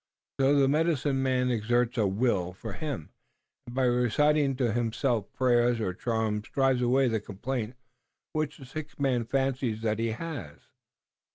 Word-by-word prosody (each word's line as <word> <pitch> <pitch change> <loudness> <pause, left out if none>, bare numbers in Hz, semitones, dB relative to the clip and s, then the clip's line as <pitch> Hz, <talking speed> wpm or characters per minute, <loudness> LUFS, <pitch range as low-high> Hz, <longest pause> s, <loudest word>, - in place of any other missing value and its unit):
So 135 +1 +4
the 140 -1 +4
medicine 145 -2 +1
man 130 -1 +1
exerts 120 +1 +1
a 110 -4 +2
will 95 -3 0
for 95 - -7
him 145 - -5 0.6
and 120 - -8
by 135 - +2
reciting 135 +4 +3
to 125 -3 +1
himself 120 -1 0
prayers 120 -2 +2
or 95 -5 -1
charms 110 0 -2
drives 135 -2 +2
away 130 +2 +3
the 115 -2 +1
complaint 115 +4 -4 0.6
which 155 -1 -2
the 135 - -11
sick 150 +4 -8
man 130 -4 +1
fancies 130 -3 -1
that 110 -1 0
he 115 - +1
has. 120 - -6
125 Hz, 155 wpm, -28 LUFS, 110-135 Hz, 0.6 s, So